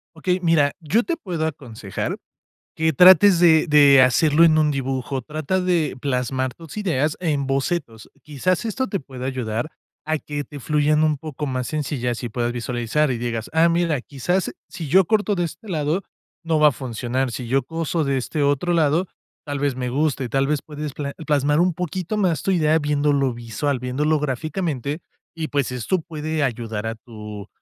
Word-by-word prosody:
Okey, 180 Hz, +3 st, 0 dB
mira, 160 Hz, -5 st, +3 dB
yo 185 Hz, +8 st, +1 dB
te 340 Hz, -, -1 dB
puedo 175 Hz, -, -3 dB
aconsejar, 120 Hz, -10 st, -5 dB, 0.6 s
que 160 Hz, 0 st, +2 dB
trates 185 Hz, +3 st, +7 dB
de 165 Hz, -1 st, +5 dB
de 145 Hz, -3 st, +7 dB
hacerlo 150 Hz, +5 st, +4 dB
en 160 Hz, -2 st, +5 dB
un 155 Hz, -1 st, +3 dB
dibujo, 135 Hz, -1 st, -2 dB
trata 155 Hz, +7 st, -2 dB
de, 175 Hz, -6 st, 0 dB
plasmar 130 Hz, -1 st, -1 dB
tus 165 Hz, -2 st, -12 dB
ideas 155 Hz, -7 st, 0 dB
en 145 Hz, -6 st, 0 dB
bocetos, 135 Hz, -4 st, -2 dB
quizás 160 Hz, -, -1 dB
esto 255 Hz, +4 st, -1 dB
te 195 Hz, -, -2 dB
pueda 130 Hz, -3 st, -8 dB
ayudar 125 Hz, 0 st, -3 dB, 0.4 s
a 155 Hz, 0 st, +1 dB
que 145 Hz, 0 st, -5 dB
te 145 Hz, 0 st, -10 dB
fluyan 150 Hz, +2 st, +2 dB
un 155 Hz, -1 st, +2 dB
poco 150 Hz, 0 st, -6 dB
más 130 Hz, -2 st, -2 dB
sencillas 130 Hz, -6 st, -2 dB
y 120 Hz, -, -3 dB
puedas 120 Hz, +1 st, -1 dB
visualizar 120 Hz, +4 st, -1 dB
y 125 Hz, -, -2 dB
digas: 115 Hz, -1 st, -3 dB
"Ah, 165 Hz, +1 st, +5 dB
mira, 165 Hz, -5 st, +1 dB
quizás 175 Hz, +9 st, -1 dB, 0.2 s
si 165 Hz, -, -6 dB
yo 185 Hz, +5 st, +5 dB
corto 210 Hz, +2 st, +1 dB
de 175 Hz, -2 st, 0 dB
este 170 Hz, +6 st, -9 dB
lado, 160 Hz, +2 st, -1 dB, 0.4 s
no 165 Hz, -2 st, +1 dB
va 150 Hz, -, +7 dB
a -, -, +5 dB
funcionar, 125 Hz, 0 st, -3 dB
si 120 Hz, +1 st, -5 dB
yo 135 Hz, +2 st, +1 dB
coso 165 Hz, +3 st, -2 dB
de 140 Hz, -1 st, 0 dB
este 145 Hz, +4 st, -2 dB
otro 145 Hz, +5 st, +1 dB
lado, 165 Hz, +2 st, +2 dB, 0.4 s
tal 145 Hz, -1 st, -3 dB
vez 140 Hz, -2 st, 0 dB
me 125 Hz, -1 st, -3 dB
guste". 140 Hz, -1 st, 0 dB
Tal 135 Hz, +2 st, +1 dB
vez 150 Hz, -1 st, 0 dB
puedes 150 Hz, -1 st, -6 dB
pla 140 Hz, -1 st, -4 dB
plasmar 145 Hz, +1 st, +2 dB
un 180 Hz, 0 st, +2 dB
poquito 180 Hz, +4 st, -3 dB
más 180 Hz, -6 st, +1 dB
tu 195 Hz, -, +1 dB
idea, 160 Hz, -3 st, +3 dB
viéndolo 145 Hz, -3 st, +1 dB
visual, 120 Hz, +4 st, -2 dB
viéndolo 145 Hz, +5 st, 0 dB
gráficamente 150 Hz, 0 st, -2 dB, 0.3 s
y 165 Hz, -1 st, -4 dB
pues 140 Hz, -4 st, -1 dB
esto 125 Hz, -, -1 dB
puede 155 Hz, -1 st, -3 dB
ayudar 115 Hz, -4 st, -3 dB
a 115 Hz, -, -3 dB
tu 105 Hz, -3 st, -10 dB
150 Hz, 185 wpm, -22 LUFS, 130-165 Hz, 0.6 s, trates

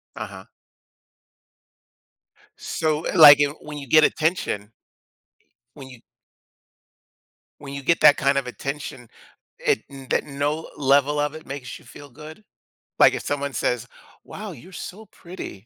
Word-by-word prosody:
Uh-huh. -, -, -8 dB, 2.1 s
So, 155 Hz, -1 st, -2 dB
eh, -, -, -3 dB
like 145 Hz, -2 st, +10 dB, 0.2 s
when 150 Hz, -1 st, -8 dB
you 140 Hz, -2 st, -8 dB
get 155 Hz, +4 st, +6 dB
attention 155 Hz, -, 0 dB, 1.0 s
when 135 Hz, -3 st, -11 dB
you 125 Hz, -3 st, -14 dB, 1.6 s
when 140 Hz, -1 st, -9 dB
you 140 Hz, -1 st, -6 dB
get 170 Hz, +4 st, +2 dB
that 145 Hz, -, +7 dB
kind 140 Hz, 0 st, +1 dB
of 130 Hz, -2 st, -1 dB
attention, 135 Hz, -2 st, -6 dB, 0.5 s
it -, -, 0 dB, 0.3 s
that -, -, +1 dB
no 145 Hz, +2 st, -3 dB
level 145 Hz, +1 st, +2 dB
of 145 Hz, +1 st, -1 dB
it 155 Hz, -, -11 dB
makes 135 Hz, -2 st, -7 dB
you -, -, -21 dB
feel 145 Hz, -1 st, -13 dB
good? 155 Hz, -, -13 dB, 0.6 s
Like, -, -, +7 dB
if -, -, -4 dB
someone 140 Hz, -1 st, -3 dB
says, 125 Hz, 0 st, -1 dB, 0.4 s
"Wow, 210 Hz, -1 st, -8 dB
you're 170 Hz, +6 st, -13 dB, 0.2 s
so 215 Hz, +4 st, -12 dB
pretty." 180 Hz, 0 st, -9 dB
145 Hz, 135 wpm, -23 LUFS, 135-155 Hz, 2.1 s, like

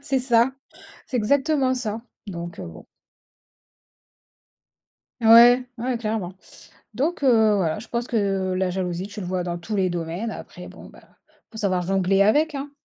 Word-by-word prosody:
c'est 275 Hz, -2 st, 0 dB
ça, 245 Hz, 0 st, +2 dB, 0.5 s
c'est 255 Hz, -, -3 dB
exactement 270 Hz, +3 st, +1 dB
ça, 225 Hz, -2 st, -4 dB, 0.2 s
donc 175 Hz, -2 st, -7 dB
heu, -, -, -6 dB
bon. 80 Hz, -1 st, -12 dB, 2.3 s
Ouais, 240 Hz, +3 st, +7 dB
ouais, 245 Hz, 0 st, -2 dB
clairement, 215 Hz, -5 st, -3 dB, 0.6 s
donc 290 Hz, -, -1 dB
heu, 220 Hz, -4 st, +4 dB
voilà, 185 Hz, +2 st, -1 dB
je 235 Hz, -, -12 dB
pense 235 Hz, 0 st, -3 dB
que 195 Hz, -5 st, -1 dB
la 185 Hz, 0 st, 0 dB
jalousie, 180 Hz, +1 st, -3 dB
tu 210 Hz, 0 st, -8 dB
le 180 Hz, -, -5 dB
vois 180 Hz, 0 st, -2 dB
dans 175 Hz, -1 st, -4 dB
tous 210 Hz, +5 st, -6 dB
les 185 Hz, -2 st, +1 dB
domaines 175 Hz, +6 st, -4 dB
après -, -, -10 dB
bon, -, -, -13 dB
bah -, -, -16 dB, 0.3 s
il -, -, -33 dB
faut 220 Hz, -, -9 dB
savoir 185 Hz, -4 st, 0 dB
jongler 195 Hz, +1 st, +2 dB
avec, 300 Hz, +9 st, +2 dB
hein? 280 Hz, +1 st, -5 dB
215 Hz, 165 wpm, -23 LUFS, 185-245 Hz, 2.3 s, Ouais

